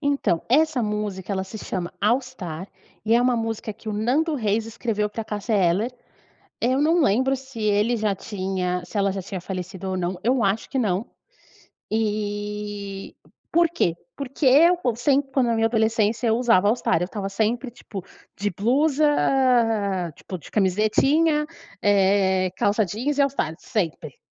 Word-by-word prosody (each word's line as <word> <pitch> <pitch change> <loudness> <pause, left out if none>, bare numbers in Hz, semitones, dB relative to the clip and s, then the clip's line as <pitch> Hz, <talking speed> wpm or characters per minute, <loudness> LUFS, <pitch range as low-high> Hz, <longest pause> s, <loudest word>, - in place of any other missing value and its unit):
então, 285 - +1
essa 290 0 +3
música 210 -2 -3
ela 190 -1 -1
se 215 +3 -9
chama 180 -4 -4
All 230 +6 +3
Star, 190 -9 -7 0.4
e 225 +1 +3
é 240 - +5
uma 250 -1 +2
música 225 -1 -3
que 220 +1 -11
o - - -2
Nando 270 +10 +1
Reis 220 -3 0
escreveu 225 -2 -2
pra 220 +1 -5
Cássia 210 +2 -2
Eller. 200 +5 +2 0.7
Eu 260 +4 +1
não 330 +3 +3
lembro 265 +1 +2
se 265 -3 -10
ele 210 +3 +2
já 210 -2 0
tinha 185 -2 -3
se 205 - -6
ela 200 -1 +2
já 195 0 -4
tinha 185 0 -6
falecido 185 0 -5
ou 185 - -2
não, 180 0 -2
eu 245 +1 +2
acho 200 +3 0
que 270 - -1
não. 205 -2 0 0.9
E 205 -2 -3 0.4
por 340 0 +4
quê? 240 - 0 0.2
Porque 275 +1 -4
eu 330 +7 +6 0.2
sempre 275 +3 +1
quando 260 -2 +2
na 230 - +1
minha 225 0 +3
adolescência 220 0 +1
eu 225 - +3
usava 230 -6 +3
o - - +5
All 220 - +3
Star 235 -4 +1
eu - - +1
estava 195 +1 -5
sempre 225 +5 -1
tipo 215 -5 -9 0.3
de 205 +1 -1
blusa, 285 - +2 1.0
tipo 185 - -7
de - - -13
camisetinha, 270 - +2 0.4
eh, 190 -2 +3
calça 205 +1 +2
jeans 245 +10 -2
e - - +4
All 280 - +3
Star, 160 - -2
sempre. 165 - -3
215 Hz, 170 wpm, -23 LUFS, 195-250 Hz, 1.0 s, eu